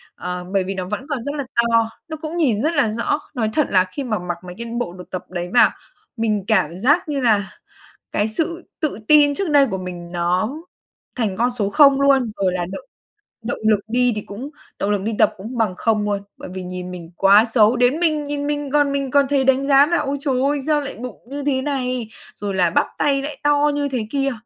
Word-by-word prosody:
ờ, 180 0 -5
bởi 195 - +2
vì 195 +1 -4
nó 185 -1 -4
vẫn 210 +5 -3
còn 260 -5 -2
rất 285 +1 -4
là 280 -3 -3
to, 230 -1 +3 0.2
nó 315 - -5
cũng 320 +2 -4
nhìn 240 -10 +2
rất 320 +3 +1
là 280 -7 +3
rõ. 290 +5 0 0.2
Nói 220 -3 0
thật 305 - +2
là 185 -1 +4
khi 280 - -3
mà 220 -4 -2
mặc 175 -1 -4
mấy 180 0 -8
cái 235 - -5
bộ 175 -7 -3
đồ 180 0 -10
tập 185 -1 -5
đấy 175 -1 -4
vào, 240 - +6 0.5
mình 215 -3 0
cảm 185 -7 +2
giác 300 - +2
như 280 -2 -1
nà 210 -5 +2 0.6
cái 210 +1 +1
sự 335 +9 -2 0.2
tự 305 -8 -1
tin 290 -1 +6
trước 385 -1 -2
đây 285 -2 +5
của 190 -5 -3
mình 175 -1 -7
nó 180 +7 0 0.6
thành 215 -6 -1
con 240 +3 +2
số 200 -1 0
0 275 0 +6
luôn, 270 -4 +3
rồi 185 -1 +2
là 175 -1 -2
động - - -7 0.6
động 240 - -3
lực 210 -2 +4
đi 245 +1 +2
thì 210 - -3
cũng 230 +9 -8 0.3
động 200 - -1
lực 205 -2 0
đi 220 +1 -2
tập - - +4
cũng 225 +6 -7
bằng 215 -5 +1
0 215 -2 +1
luôn, 200 -1 -1 0.2
bởi - - -9
vì 185 0 -5
nhìn 180 0 -6
mình 175 -2 -9
quá 200 +3 +6
xấu. 225 0 +4
Đến 250 +6 +2
mình 310 -3 +1
nhìn 285 0 -3
mình 290 -2 -2
còn 290 -1 +3
mình 275 -2 -2
còn 280 -1 +4
thấy 275 -2 +2
đánh 270 +1 +2
giá 280 +1 +6
là 345 - +1
"Ôi, 285 -1 -1
trời 265 -3 0
ơi, 285 +1 +1
sao 300 -1 +2
lại 280 - -6
bụng 245 -1 -8
như 285 0 -5
thế 265 -2 +1
này? 255 -5 -2 0.3
Rồi 200 -2 -4
là 180 -2 +3
"Bắp - - +2
tay 275 -1 +2
lại 295 +2 -6
to 290 0 +3
như 285 -1 -1
thế 240 -5 -3
kia!" 275 -1 0
245 Hz, 240 wpm, -21 LUFS, 200-285 Hz, 0.6 s, vào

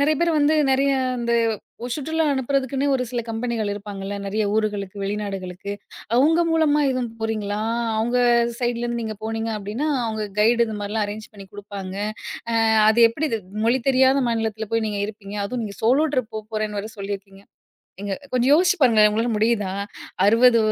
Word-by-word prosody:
நிறைய 305 +2 +3
பேர் 340 0 +2
வந்து 295 +2 +3 0.2
நிறைய 275 +1 +3 0.3
இந்த 235 0 -1 0.5
ஒரு 245 - -4
சுற்றுலா 320 +2 -1
அனுப்பறதுக்குன்னே 270 +1 0
ஒரு 255 - -2
சில 245 -1 -1
கம்பெனிகள் 225 -2 -2
இருப்பாங்கள்ல, 200 -1 -6
நிறைய 215 +2 -1
ஊர்களுக்கு, 205 -2 -1
வெளிநாடுகளுக்கு, 195 -2 -4 0.4
அவங்க 320 +6 +4
மூலமா 305 -2 +3
எதும் 255 -2 -2
போறீங்களா? 215 -2 -2 0.4
அவங்க 240 +3 +1 0.4
சைட்லேருந்து 240 -1 -1
நீங்க 220 -1 -4
போனீங்க 225 0 -2
அப்படின்னா, 215 +9 -3 0.2
அவங்க 220 -1 -2 0.2
கைடு 235 +2 +4
இந்த 220 -1 -5
மாரில்லாம் 205 +1 -1
அரேஞ்ச் 215 +1 -7
பண்ணி 200 -2 -11
குடுப்பாங்க. 200 -2 -7 0.6
அ - - 0 0.3
அது 220 +2 +4
எப்படி 300 +7 -2
இது 225 - -1 0.3
மொழி 245 +2 +3
தெரியாத 265 +1 +4
மாநிலத்தில 220 -2 -2
போய் 225 -1 +1
நீங்க 205 -1 -3
இருப்பீங்க? 205 -1 -8
அதுவும் 235 +3 -3
நீங்க 200 -2 -7
சோலோ 265 +8 +4
ட்ரிப் 250 -4 -1
போப்போறேன்னு 215 -1 -3
வேற 215 - -7
சொல்லியிருக்கீங்க." 195 0 -7 0.6
நீங்க 200 -1 -3 0.2
கொஞ்சம் 255 +1 +2
யோசிச்சு 355 +4 +4
பாருங்களேன். 225 -7 +5
உங்களால 225 +3 0
முடியுதா? 210 -3 +1 0.5
60 230 +3 +6
225 Hz, 160 wpm, -23 LUFS, 205-255 Hz, 0.6 s, 60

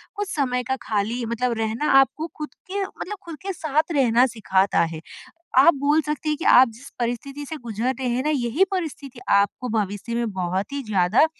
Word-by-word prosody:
कुछ 410 -1 -3
समय 250 -3 0
का - - +3
खाली 220 +3 -1
मतलब 235 +2 -1
रहना 225 +6 0
आपको 310 +4 +1
खुद 300 -4 -6 0.2
के 400 +1 -1
मतलब 410 +1 -7
खुद 335 -2 -7
के 390 0 -3
साथ 310 0 -1
रहना 250 -5 +4
सिखाता 195 -2 +2
है। 160 - -7 0.6
आप 285 +6 +8
बोल 295 +2 +3
सकते 300 0 -3
हैं 300 - 0
कि 330 - -6
आप 260 +1 +8
जिस 235 +5 -13
परिस्थिति 245 +5 -3
से 315 - -4
गुजर 235 0 -2
रहे 260 - -1
हैं 245 +2 0
ना 300 - 0
यही 280 +4 +2
परिस्थिति 295 -8 -4 0.2
आपको 245 +5 -3
भविष्य 205 +3 -3
में 235 -2 -1
बहुत 185 +3 -2
ही 280 - -3
ज़्यादा 195 - +3
255 Hz, 195 wpm, -23 LUFS, 225-300 Hz, 0.6 s, आप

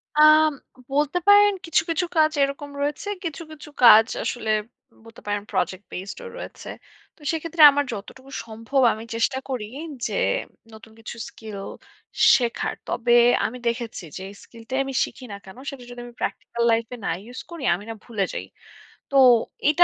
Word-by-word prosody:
আম 305 +1 +7 0.4
বলতে 295 +4 +1
পারেন 410 0 +7
কিছু, 330 -2 +2
কিছু 330 +2 0
কাজ 310 0 +5
এরকম 280 +1 -3
রয়েছে। 295 +7 -2 0.2
কিছু, 330 -2 -5
কিছু 300 -1 -11
কাজ 225 -2 +9 0.2
আসলে 230 -3 -3 0.6
বলতে 225 0 -14
পারেন 205 0 -1
প্রজেক্ট 190 +2 -2
বেসড 190 +3 -6
ও - - -6
রয়েছে। - - -9 0.5
তো - - -26
সেক্ষেত্রে 330 0 -2
আমার 285 +1 +1
যতটুকু 260 +6 -10
সম্ভব 230 +5 -1
আমি 220 - -8
চেষ্টা 230 +4 +1
করি 250 -5 -3 0.4
যে, - - -6 0.6
নতুন 220 0 -14
কিছু 225 - -8
স্কিল 215 -2 -9 0.8
শেখার। 240 -3 -1
তবে 240 0 -1 0.3
আমি 250 - -3
দেখেছি, 235 -4 -3
যেই 190 +1 -7
স্কিলটাই 235 +3 -6
আমি 270 - -5
শিখি 260 - -12
না - - -5
কেন, 190 +3 -13
সেটা 270 -3 -9
যদি 245 - -9
আমি 240 - -12
প্র্যাকটিক্যাল 235 - -3
লাইফ-এ 230 +2 -1
না - - 0
ইউজ 245 +3 -9
করি, 335 -4 -7
আমি 190 - -9
না - - -3
ভুলে 215 -5 -2
যাই। - - -4 0.7
তো, - - -3 0.5
এটা 310 +4 +6
250 Hz, 165 wpm, -23 LUFS, 225-300 Hz, 0.8 s, কাজ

